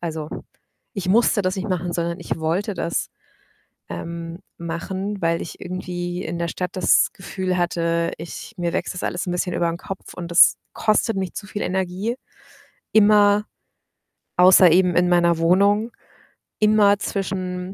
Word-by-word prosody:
Also, 160 -3 -4 0.7
ich 190 -3 -4
musste 215 0 +3
das 185 +1 -1
nicht 190 +3 -4
machen, 180 -2 -2
sondern 170 +1 -2
ich 170 - -4
wollte 170 +6 -1
das, 170 -1 -2 0.8
ähm, 170 0 -6 0.2
machen, 190 +4 -4
weil 165 0 +1
ich - - -8
irgendwie 180 -1 -4
in 170 +1 -4
der 170 - -1
Stadt 180 -1 -4
das - - +4
Gefühl 185 -1 -3
hatte, 170 -1 0
ich 170 +7 -8
mir 175 -1 -1
wächst 185 - -2
das 180 - -6
alles 180 +2 -3
'n - - -1
bisschen 180 0 -2
über 170 - +1
'n 170 - -4
Kopf 195 +1 -8
und 175 -1 -7
das 170 - +7 0.2
kostet 215 0 +1
mich 190 -2 -3
zu 200 - -7
viel 205 +2 -5
Energie, 190 +5 -2 0.8
immer 210 -1 +5 0.9
außer 180 0 +7
eben 180 0 +4
in 180 0 +3
meiner 170 -1 +3
Wohnung, 200 +7 +3 0.7
immer 210 -1 +4
zwischen 185 -2 -4
180 Hz, 155 wpm, -22 LUFS, 170-195 Hz, 0.9 s, das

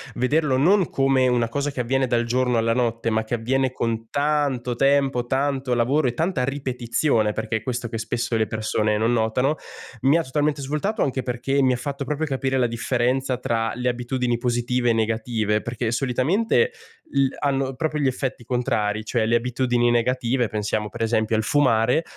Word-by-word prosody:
vederlo 140 +2 +1
non 180 +6 +3
come 135 -1 +2
una 120 -2 +1
cosa 145 +4 -2
che 130 -2 -3
avviene 130 +2 0
dal 120 -1 +1
giorno 125 0 +1
alla 115 0 +2
notte, 115 -1 0
ma 110 0 0
che 110 - -6
avviene 130 +3 0
con 115 -2 -3
tanto 140 -4 0
tempo, 135 -2 +2
tanto 135 0 0
lavoro 130 +5 +2
e 120 - -1
tanta 160 -2 0
ripetizione, 125 -4 0
perché 110 +1 -2
è - - -7
questo 120 0 -3
che 115 - -4
spesso 115 +1 -2
le 110 - +1
persone 110 0 0
non 115 +2 +1
notano, 120 +5 +1 0.5
mi 140 +5 +5
ha 165 - 0
totalmente 145 +1 -1
svoltato. 150 - -2
Anche 130 -1 -1
perché 130 +3 -1
mi 130 -1 +3
ha - - -1
fatto 140 +2 -4
proprio 150 +2 -2
capire 135 -1 -1
la 125 - +3
differenza 125 +3 0
tra 115 -2 -1
le 125 +1 0
abitudini 125 0 -1
positive 120 0 0
e - - +2
negative, 110 -1 0
perché 115 -1 -3
solitamente 155 - +1 0.4
il 135 -1 +1
hanno 135 -2 -1
proprio 155 +2 -2
gli 140 - +2
effetti 130 -1 -3
contrari. 110 -4 -1
Cioè, 115 -3 +1
le 115 +2 +1
abitudini 120 -1 +1
negative, 120 +1 +1
pensiamo 105 0 -2
per 120 - -8
esempio 110 -1 +1
al 110 - +2
fumare, 125 +1 +2
125 Hz, 180 wpm, -23 LUFS, 115-135 Hz, 0.5 s, mi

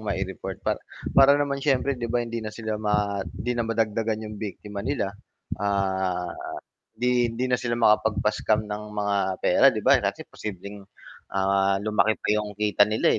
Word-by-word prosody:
mai-report 95 -3 -4
pa - - 0 0.3
para 140 +1 +7
naman 140 -1 -1
siyempre 140 -1 +2
'di 120 - -2
ba 120 +1 0
hindi 115 0 -4
na 110 - -5
sila 110 -1 -4
ma 105 -1 0
hindi 95 +6 -4
na 120 -2 -2
madagdagan 110 0 0
'yong 105 -1 -8
biktima 105 -1 -6
nila. 105 -5 -2 0.5
Ah, 95 -3 0 0.7
'di 125 +1 +2
hindi 125 +2 -1
na 125 - +3
sila 120 -1 -1
makapagpa-scam 110 -1 +2
ng 105 0 -3
mga 105 -1 0 0.3
pera - - +5
'di - - -3
ba - - +6
kasi - - -2
posibleng, 100 0 -7 0.6
ah, 95 0 +2
lumaki 110 +1 +2
pa - - -7
'yong 105 -1 -4
kita 105 0 +3
nila, 110 +1 +2
105 Hz, 165 wpm, -25 LUFS, 100-115 Hz, 0.7 s, para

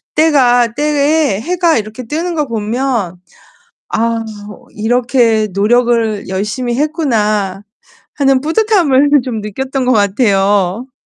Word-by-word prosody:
때가 250 -7 +3
때에 295 -4 +1
해가 345 +2 +1
이렇게 220 +3 -5
뜨는 330 +8 -3
거 300 -2 -1
보면 225 -4 -2 0.7
'아 230 0 -1 0.5
이렇게 230 0 +1
노력을 225 0 +1
열심히 210 +6 -3
했구나.' 215 - -1 0.5
하는 270 -2 +2
뿌듯함을 320 - +2
좀 235 -4 -4
느꼈던 260 +5 -3
것 255 - +2
같아요. 205 +1 +1
240 Hz, 225 characters per minute, -14 LUFS, 215-285 Hz, 0.7 s, 때가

